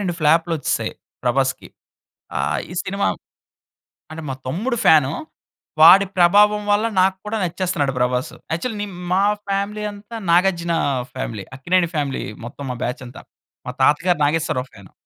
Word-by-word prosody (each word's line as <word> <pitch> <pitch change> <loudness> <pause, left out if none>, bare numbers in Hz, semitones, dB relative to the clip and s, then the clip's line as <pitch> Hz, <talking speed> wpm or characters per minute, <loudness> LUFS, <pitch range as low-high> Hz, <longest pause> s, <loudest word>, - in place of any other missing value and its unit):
రెండు 175 -3 -2
ఫ్లాప్‌లొచ్చేసాయి, 165 +1 +1 0.3
ప్రభాస్‌కి. 135 +2 0 0.7
ఆహ్, - - 0
ఈ - - -6
సినిమా - - -1 1.1
అంటే 160 0 -7
మా - - -2
తమ్ముడు 220 - -2
ఫ్యానూ. 145 -3 +5 0.7
వాడి 190 +5 +9
ప్రభావం 205 +4 +5
వల్ల 215 +2 +2
నాకు 190 +1 +3
కూడా 220 +1 -2
నచ్చేస్తున్నాడు 170 -6 -1
ప్రభాసు. 125 +3 0 0.2
యాక్చువల్లీ 210 +6 -3
నే 205 - -3 0.3
మా 190 +2 +3 0.3
ఫ్యామిలీ 200 +2 -2
అంతా, 205 +3 -10
నాగార్జున 170 -1 +2 0.4
ఫ్యామిలీ 115 -6 -5
అక్కినేని 175 +5 +1
ఫ్యామిలీ 145 -3 -2 0.2
మొత్తం 140 +4 -9
మా 125 - -3
బ్యాచ్ 125 +1 -4
అంతా. 120 - -11 0.4
మా 125 - -4
తాతగారు, 170 +5 +3
నాగేశ్వరరావు 145 -4 0
ఫ్యాను. 95 -2 -15
170 Hz, 135 wpm, -21 LUFS, 135-195 Hz, 1.1 s, వాడి